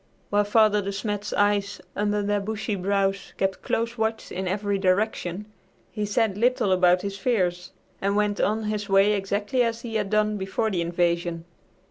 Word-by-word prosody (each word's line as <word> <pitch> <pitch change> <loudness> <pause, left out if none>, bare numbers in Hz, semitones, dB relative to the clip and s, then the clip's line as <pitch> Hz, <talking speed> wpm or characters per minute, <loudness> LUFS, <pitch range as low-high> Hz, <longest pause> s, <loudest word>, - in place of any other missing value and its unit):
While 205 0 +3
Father 210 0 +4
De 200 0 -3
Smet's 205 +1 -3
eyes, 205 0 +1 0.2
under 205 0 0
their 205 0 +1
bushy 215 +1 -3
brows, 195 0 -1
kept 195 -1 -1
close 230 +1 -2
watch 220 0 -2
in 190 +1 -3
every 200 +1 -1
direction, 190 0 0 0.5
he 210 -2 -3
said 205 -1 0
little 240 -4 +2
about 180 0 +4
his 200 0 -4
fears 180 -7 0 0.3
and 200 +1 +1
went 210 -1 +1
on 220 +2 +1
his 210 -1 -3
way 195 +2 +5
exactly 205 +5 0
as 230 -1 0
he 235 -2 -6
had 210 -3 -1
done 215 0 +1
before 195 +3 -1
the 180 -3 0
invasion. 170 0 -1
205 Hz, 170 wpm, -25 LUFS, 195-215 Hz, 0.5 s, way